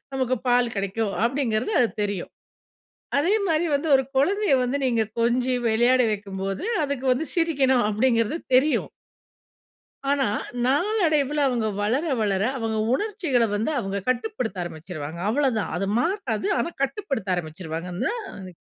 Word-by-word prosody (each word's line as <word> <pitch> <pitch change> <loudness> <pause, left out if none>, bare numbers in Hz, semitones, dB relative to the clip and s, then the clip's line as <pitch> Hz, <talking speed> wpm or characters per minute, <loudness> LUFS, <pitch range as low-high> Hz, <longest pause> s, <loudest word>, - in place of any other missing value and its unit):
நமக்கு 255 -1 0
பால் 245 -1 +3
கிடைக்கும். 200 +2 -1
அப்படின்கிறது 245 - 0
அது 235 - +4
தெரியும். 200 -3 -3 0.9
அதே 340 +8 +3
மாரி 325 0 +2
வந்து 285 +3 0
ஒரு 265 - +5
குழந்தைய 390 +6 +2
வந்து 250 +2 0
நீங்க 235 -3 +2 0.2
கொஞ்சி 245 +2 +2
விளையாட 240 +3 +4
வைக்கும்போது, 195 - -4 0.2
அதுக்கு 280 -2 -3
வந்து 280 +6 -1
சிரிக்கணும். 275 -8 +2
அப்படிங்கிறது 230 +4 +1 0.2
தெரியும். 290 +4 +2 1.2
ஆனா, 280 -2 +2 0.4
நாளடைவில 300 - +2
அவங்க 240 -4 0 0.2
வளர 240 +9 +1 0.2
வளர 200 -2 +1 0.2
அவங்க 225 -2 -2 0.2
உணர்ச்சிகள 345 - 0
வந்து 220 +9 0
அவங்க 195 -3 -2
கட்டுப்படுத்த 250 - -1
ஆரம்பிச்சிருவாங்க. 160 -1 -7
அவ்வளோதான் 240 -3 +1
அது 195 +2 -1
மாறாது 270 - -1
ஆனா 340 - -1
கட்டுப்படுத்த 270 - -1
ஆரம்பிச்சிடுவாங்க 165 +1 -5
நா - - +1 0.3
அது. 185 -2 -9
245 Hz, 130 wpm, -24 LUFS, 205-285 Hz, 1.2 s, ஒரு